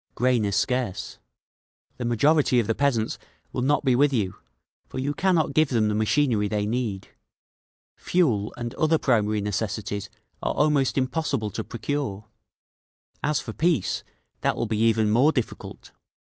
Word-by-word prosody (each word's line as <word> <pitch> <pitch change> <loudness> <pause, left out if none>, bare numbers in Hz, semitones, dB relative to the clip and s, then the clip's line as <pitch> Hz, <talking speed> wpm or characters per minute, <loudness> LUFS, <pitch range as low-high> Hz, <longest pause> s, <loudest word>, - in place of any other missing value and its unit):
Grain 125 -3 +2
is 100 -1 -1
scarce. 110 -6 -1 0.8
The 125 - -4
majority 130 +2 +3
of 115 - +1
the 115 - +1
peasants 120 -4 0 0.3
will - - -2
not 145 +3 +1
be 130 -2 +4
with 145 +3 +4
you, 105 -8 -1 0.5
for - - -8
you 140 +3 -1
cannot 170 -5 +1
give 155 0 +3
them 110 -4 +2
the - - 0
machinery 110 0 +2
they 105 0 -1
need. 110 -4 -3 0.9
Fuel 120 - +1
and 120 0 -4
other 160 +1 +2
primary 110 -6 +1
necessities 105 0 -3 0.3
are - - -1
almost 145 -3 +2
impossible 130 -5 -1
to - - -4
procure…. 115 -4 -4 1.0
"As 150 -1 +1
for 115 - -7
peace, 160 - 0 0.4
that - - +1
will 120 - 0
be 110 -1 -2
even 110 -1 +3
more 130 +8 +5
difficult. 125 -7 -5
120 Hz, 150 wpm, -25 LUFS, 105-140 Hz, 1.0 s, more